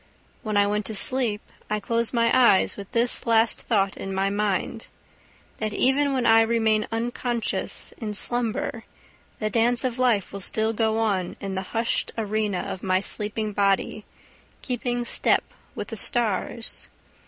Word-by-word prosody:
When 215 -2 -2
I 205 - +5
went 210 0 -1
to 220 - -3
sleep 230 -1 +1 0.3
I 210 0 0
closed 230 +3 -1
my 230 -1 +2
eyes 240 -7 +4
with 200 -1 -9
this 240 +1 +2
last 225 0 +3
thought 195 -4 +1
in 195 0 -5
my 195 +1 +1
mind, 205 +2 -1 0.7
that 215 -1 -2
even 280 +2 +3
when 260 -2 0
I 225 0 +6
remain 220 -2 +2
unconscious 235 0 -3
in 210 -3 -4
slumber 240 +5 -1 0.5
the 215 -1 -2
dance 240 +1 +2
of 255 -1 -2
life 235 -7 +2
will 200 - -5
still 220 +3 0
go 220 0 +1
on 200 -5 0
in 195 -1 -5
the 190 - -2 0.2
hushed 230 +1 0
arena 215 -3 -1
of 190 - -5
my 185 -1 +2
sleeping 210 +2 -2
body, 200 +1 +1 0.6
keeping 245 -1 -2
step - - +2 0.3
with - - -5
the - - -6
stars. 230 -1 0
220 Hz, 155 wpm, -25 LUFS, 205-235 Hz, 0.7 s, I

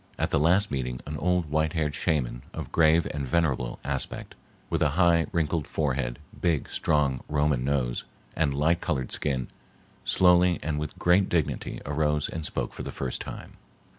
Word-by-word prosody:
At - - -1
the - - +3
last 90 +7 +3
meeting 60 -2 -2
an 75 - -5
old 90 -1 0
white 80 +1 +1
haired 75 -3 0
shaman 70 -6 -1
of - - -6
grave 80 0 +4
and 75 -2 -3
venerable 65 -6 0
aspect, 70 -2 -3 0.3
with - - -1
a 75 - +4
high 85 -2 +4
wrinkled 80 -2 0
forehead, 65 -5 -1 0.2
big, 85 -5 +1
strong 70 -4 +1
Roman 75 -3 +1
nose 65 -3 0 0.3
and 80 -3 +1
light 80 +5 +2
colored 65 -7 -2
skin, 65 -4 -1 0.6
slowly 90 -1 +4
and 75 -2 -1
with 75 -1 -5
great 90 +2 +3
dignity 85 -3 -1
arose 75 0 0
and 80 - -5
spoke 75 - -2
for - - -7
the - - -5
first 65 -2 -3
time. - - -8
75 Hz, 165 wpm, -27 LUFS, 70-85 Hz, 0.6 s, grave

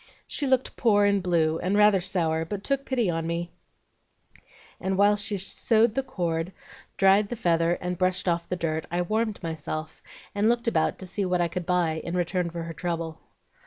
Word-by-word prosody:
She 285 - -1
looked 260 -1 +1
poor 205 -4 +4
and 200 -1 +2
blue 165 -3 +1
and 190 +3 0
rather 210 -2 +5
sour, 165 -3 +1
but 195 +4 -5
took 275 0 -1
pity 245 -5 +1
on 165 -1 -1
me; 170 +1 -3 1.3
and 190 0 -1
while 205 +1 +5
she 205 0 -1
sewed 220 +4 +2
the 270 - 0
cord, 175 -9 -2 0.5
dried 195 +1 +4
the 240 - -3
feather, 170 -5 +2
and 180 0 -4
brushed 185 0 +1
off 170 -1 0
the 180 - 0
dirt, 160 -2 -2
I 175 +1 0
warmed 215 +1 -1
myself 155 -1 -5 0.3
and 205 +2 +2
looked 235 0 0
about 160 -9 +1
to 190 - -7
see 200 +2 -2
what 180 -1 0
I 175 - +2
could 175 +1 -5
buy 170 -3 +1
in 170 +1 -3
return 175 0 0
for 170 0 -5
her 165 0 -6
trouble. 165 -1 -4
180 Hz, 195 wpm, -26 LUFS, 170-205 Hz, 1.3 s, rather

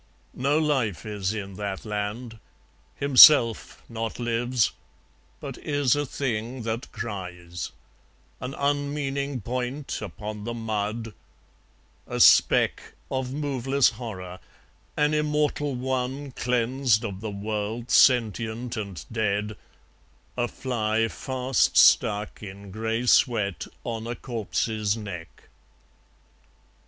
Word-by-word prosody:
No 140 +4 +1
life 135 - 0
is 105 -3 -2
in 100 -3 -6
that 100 -1 -4
land, 110 +2 -4 0.6
Himself 140 -4 +6
not 115 -1 -4
lives, 120 0 +1 0.7
but - - -7
is 145 -4 +1
a 145 -1 -1
thing 120 -2 -3
that 115 +2 -4
cries; 90 -5 -6 0.7
An 130 +2 -5
unmeaning 140 -2 -1
point 125 +5 -4
upon 105 +1 -6
the 120 +2 -4
mud; 110 0 -3 0.9
a - - -4
speck - - +5 0.2
Of 130 -1 -2
moveless 140 -2 +1
horror; 95 -6 -7 0.6
an 150 +1 +2
Immortal 150 -2 0
One 130 +2 -3
Cleansed 125 -1 +1
of 100 -3 -5
the 110 - -4
world, 105 +3 -4
sentient 120 -1 +3
and 100 -8 -6
dead; 105 -1 -1 0.8
a 120 -1 0
fly 115 -3 -1
Fast 130 0 0
stuck 105 -1 +4
in 100 -1 -9
grey 110 +3 -2
sweat 110 -6 +2 0.2
on 115 -1 -4
a 120 - -3
corpse's 110 -2 -2
neck. 90 -6 -9
115 Hz, 105 wpm, -26 LUFS, 105-130 Hz, 0.9 s, Himself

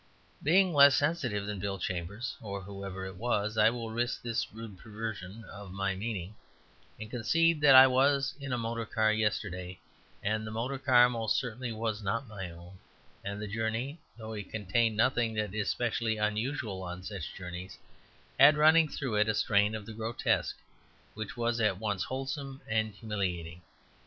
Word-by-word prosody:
Being 180 +4 +4
less 140 -2 +8
sensitive 145 -10 0
than 105 -1 -4
Bill 100 0 -2
Chambers 95 +6 -4
(or 100 -3 -5
whoever 100 -1 -6
it 95 -1 -8
was) 110 -2 0
I 110 0 +6
will 115 -1 -5
risk 120 +2 -1
this 115 -1 -2
rude 110 -4 -9
perversion 110 -2 -6
of 100 -2 -10
my 100 0 -1
meaning, 100 -1 -4 0.7
and 110 - -6
concede 165 +7 +2
that 140 -2 +8
I 130 0 +11
was 135 +1 +3
in 140 -2 -6
a 125 - +1
motor 115 -1 -3
car 110 -1 +2
yesterday, 95 -4 -2 0.5
and 110 +2 0
the 110 - -5
motor 120 +5 -3
car 125 -2 +6
most 115 -3 0
certainly 125 -3 -3
was 110 -1 -2
not 115 +6 -2
my 100 -4 -6
own, 85 +3 -13 0.4
and 100 +1 -4
the 105 - -4
journey, 115 +8 -2 0.2
though 110 -1 -7
it 105 -3 -6
contained 110 +2 0
nothing 115 -1 +2
that 105 -3 -2
is 105 -1 -1
specially 115 -2 0
unusual 105 -1 -2
on 90 0 -6
such 95 -5 -6
journeys, 90 0 -7 0.6
had 145 +3 +8
running 155 +1 +6
through 130 -8 -2
it 105 +1 +3
a 110 - +1
strain 105 0 +2
of 105 -2 -6
the 110 - -8
grotesque 115 +2 -1 0.6
which 110 +2 -6
was 120 0 0
at 105 -4 +2
once 105 -2 -2
wholesome 135 +2 -4
and 110 -1 0
humiliating. 90 -6 -3
110 Hz, 170 wpm, -30 LUFS, 100-120 Hz, 0.7 s, I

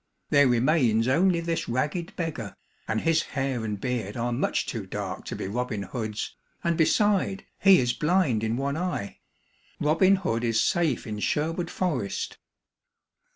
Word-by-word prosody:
There 145 -1 +6
remains 120 -2 +3
only 170 +6 +3
this 165 -4 -2
ragged 150 +8 -2
beggar, 155 - -4 0.3
and 110 0 0
his 165 0 +3
hair 135 -4 -2
and 105 -2 -3
beard 115 -3 -3
are 120 +1 -1
much - - 0
too - - -5
dark - - -5
to - - -5
be - - -4
Robin 110 -1 -2
Hood's, 110 0 -4 0.3
and 170 -1 +1
beside, 195 +3 +2
he 195 -1 +7
is 125 -1 +1
blind 150 - +1
in 115 +1 0
one 140 +2 -1
eye. 175 - -3 0.6
Robin 165 +6 +4
Hood 120 -12 -1
is 115 -2 +2
safe 165 -7 +1
in 105 -2 -5
Sherwood 165 - -1
Forest." 135 - -2
135 Hz, 155 wpm, -26 LUFS, 115-170 Hz, 0.6 s, he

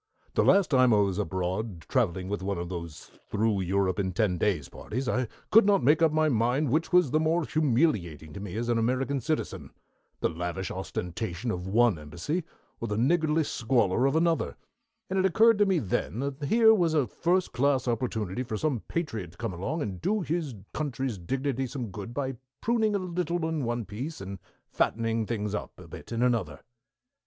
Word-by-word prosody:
"The - - +3
last 195 -4 +4
time 130 -4 +5
I - - +4
was 100 -1 +1
abroad 95 +1 -2
traveling 95 -6 0
with 100 0 -3
one 100 0 -2
of 85 0 -4
those 85 -4 -7 0.2
Through 105 -2 +1
Europe 95 0 0
in 95 -2 -1
Ten 90 -2 +1
Days 90 -10 0
parties, 130 +4 -5
I 125 0 0 0.2
could 225 - +8
not 200 -9 +4
make 150 +6 +4
up 165 -2 +5
my 155 0 +3
mind 125 +2 +1
which 160 +6 +1
was 180 -7 +4
the 155 - +3
more 160 +1 +1
humiliating 115 - 0
to 100 - -7
me 100 -2 -6
as 120 +1 -2
an 120 -1 +2
American 130 +4 0
citizen, 155 +2 -3 0.5
the - - +2
lavish 90 +2 -4
ostentation 95 +3 -4
of 90 -1 -4
one 110 -3 +3
embassy, 85 - -3 0.4
or 115 - -3
the 105 -1 -2
niggardly 155 +5 +2
squalor 120 -3 +1
of 135 - 0
another; 165 0 +1 0.5
and 190 +1 0
it 190 - +3
occurred 225 +3 +5
to 205 - +5
me 190 -2 +3
then 105 - -1
that 140 +2 -3
here 220 +6 +6
was 170 -6 +2
a 145 -4 +3
first 175 - 0
class 135 -1 +2
opportunity 115 -4 -1
for 115 -4 -3
some 140 -1 0
patriot 110 - -3
to - - -21
come 115 -5 -3
along 135 - -2
and 95 -6 -5
do 215 - +1
his 160 -6 -2 0.2
country's 135 -7 -2
dignity 135 +7 -2
some 120 -5 -5
good 100 +4 -7
by 135 +1 -2 0.3
pruning 220 -3 +1
a - - +3
little 175 -2 -2
in 160 -3 -2
one 120 -1 -2
place, 130 +12 -6
and 95 0 -7 0.3
fattening 115 -1 0
things 105 -3 -2
up 105 - -5
a - - -12
bit - - -10
in 115 +1 0
another." 115 -6 0
120 Hz, 195 wpm, -28 LUFS, 100-155 Hz, 0.5 s, could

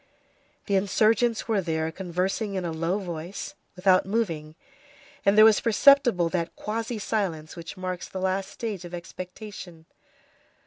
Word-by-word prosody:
The 200 - 0
insurgents 220 +4 +2
were 215 -3 +2
here 160 -2 -1
conversing 190 +4 -2
in 185 -2 -2
a 170 - -2
low 165 +4 -1
voice, 175 -1 -6 0.2
without 185 0 +4
moving, 165 -8 -2 0.7
and 200 +1 +3
there 215 - +10
was 220 -1 +5
perceptible 240 -5 +5
that 170 -1 -2
quasi 225 +2 -3
silence 190 -8 -2
which 170 0 -8
marks 185 -1 -4
the 190 - -5
last 190 +1 -1
stage 210 -6 -5
of 175 0 -7
expectation. 180 -1 -9
190 Hz, 140 wpm, -26 LUFS, 170-215 Hz, 0.7 s, there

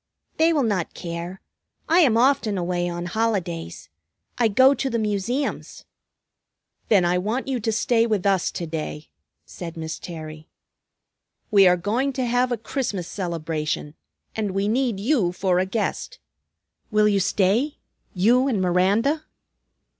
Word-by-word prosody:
"They 325 +1 +4
will 300 -4 +2
not 200 -7 -1
care. 170 +2 -6 0.5
I 335 +3 +4
am 255 -10 +4
often 240 -5 +2
away 175 0 -1
on 175 0 -4
holidays. 175 - -2 0.5
I 235 - +4
go 260 +6 +5
to 270 0 -2
the 235 - -1
Museums." 215 +6 -2 1.0
"Then 195 -5 +4
I 180 +1 +2
want 220 +9 -2
you 260 -2 -1
to 225 0 -1
stay 230 +1 +2
with 210 -4 -1
us 195 -2 +2
to 170 - -4
day," 155 -1 -5 0.4
said 170 -2 -8
Miss 160 0 -5
Terry. 155 -2 -8 1.0
"We 200 -3 +7
are 180 0 +4
going 235 +10 -1
to 255 -1 -1
have 245 +1 +1
a 240 - 0
Christmas 210 -6 -3
celebration, 160 -5 -3 0.4
and 210 -3 -2
we 195 +1 +1
need 235 -2 0
you 215 -5 +1
for 180 -1 +1
a 185 - 0
guest. 230 - -3 0.7
Will 210 -1 +3
you 200 -1 +2
stay, 205 - +1 0.4
you 240 +8 +3
and 235 -7 0
Miranda?" 200 - +2
205 Hz, 145 wpm, -23 LUFS, 175-240 Hz, 1.0 s, We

